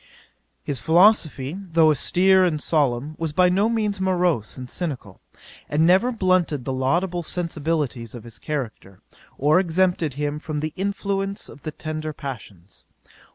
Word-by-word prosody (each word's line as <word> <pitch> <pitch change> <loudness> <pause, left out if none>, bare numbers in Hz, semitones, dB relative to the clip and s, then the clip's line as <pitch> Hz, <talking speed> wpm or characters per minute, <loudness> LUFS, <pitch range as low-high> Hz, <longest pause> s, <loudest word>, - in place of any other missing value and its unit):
'His 140 -3 -3
philosophy, 160 - +3 0.2
though 160 -1 +5
austere 185 +5 +4
and 165 -4 +1
solemn, 145 -2 0
was 165 -2 -2
by 180 +2 +4
no 200 +5 +2
means 210 -4 -1
morose 180 - 0
and 130 -1 -7
cynical, 130 - -5 0.5
and 155 +2 +2
never 190 +8 +4
blunted 185 - +1
the 135 - -2
laudable 170 +8 0
sensibilities 155 -8 -3
of 120 - -9
his 115 -2 -12
character, 115 -10 -6 0.4
or 150 +5 +4
exempted 175 -4 +1
him 145 +1 -2
from 155 -1 -4
the 155 +1 -3
influence 195 0 -2
of 145 - -13
the 155 - -5
tender 155 0 -5
passions. 105 - -9
155 Hz, 145 wpm, -23 LUFS, 140-185 Hz, 0.5 s, though